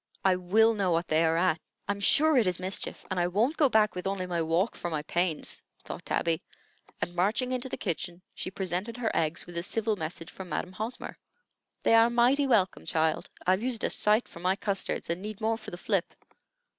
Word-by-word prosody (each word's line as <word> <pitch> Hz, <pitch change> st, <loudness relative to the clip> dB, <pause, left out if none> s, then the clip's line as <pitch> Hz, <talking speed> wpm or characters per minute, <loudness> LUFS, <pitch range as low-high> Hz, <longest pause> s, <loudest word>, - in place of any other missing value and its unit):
"I 190 Hz, -1 st, +5 dB
will 215 Hz, +6 st, +4 dB
know 200 Hz, -4 st, 0 dB
what 170 Hz, 0 st, +1 dB
they 155 Hz, +1 st, +3 dB
are 165 Hz, 0 st, +2 dB
at. 170 Hz, -2 st, +2 dB, 0.3 s
I'm 200 Hz, 0 st, -1 dB
sure 310 Hz, +9 st, +4 dB
it 235 Hz, -6 st, +4 dB
is 180 Hz, -1 st, 0 dB
mischief, 185 Hz, +2 st, -2 dB
and 185 Hz, -, 0 dB
I 175 Hz, -, +2 dB
won't 220 Hz, -, +1 dB
go 290 Hz, -4 st, +4 dB
back 215 Hz, -4 st, +3 dB
with 180 Hz, +1 st, -4 dB
only 195 Hz, -1 st, -1 dB
my 175 Hz, -2 st, -1 dB
walk 165 Hz, +6 st, +1 dB
for 175 Hz, -, -4 dB
my 155 Hz, -3 st, -2 dB
pains," 170 Hz, 0 st, -1 dB, 0.2 s
thought -, -, -7 dB
Tabby; 165 Hz, -1 st, +1 dB, 0.6 s
and 175 Hz, -, -2 dB
marching 210 Hz, +8 st, +1 dB
into 255 Hz, 0 st, -2 dB
the -, -, -4 dB
kitchen, 175 Hz, -1 st, -3 dB
she -, -, -5 dB
presented 190 Hz, +4 st, -3 dB
her 235 Hz, -2 st, -1 dB
eggs 160 Hz, +1 st, 0 dB
with 175 Hz, -1 st, -9 dB
a -, -, 0 dB
civil 215 Hz, +4 st, 0 dB
message 165 Hz, -1 st, -6 dB
from 190 Hz, -2 st, -9 dB
Madam 180 Hz, -, -2 dB
Hosmer. 220 Hz, +6 st, -6 dB, 0.6 s
"They -, -, +4 dB
are 225 Hz, +1 st, +7 dB
mighty 250 Hz, +4 st, +3 dB
welcome, 205 Hz, -7 st, +2 dB
child. 160 Hz, -1 st, +1 dB, 0.2 s
I've 185 Hz, +2 st, +3 dB
used 240 Hz, -2 st, -1 dB
a -, -, +1 dB
sight 215 Hz, +3 st, +2 dB
for -, -, -12 dB
my 185 Hz, +2 st, +1 dB
custards, 200 Hz, -1 st, -2 dB
and 170 Hz, +2 st, -2 dB
need 210 Hz, 0 st, -6 dB
more 225 Hz, 0 st, +1 dB
for 225 Hz, -, -9 dB
the 175 Hz, -, -7 dB
flip. 190 Hz, -1 st, -1 dB
190 Hz, 215 wpm, -29 LUFS, 175-225 Hz, 0.6 s, are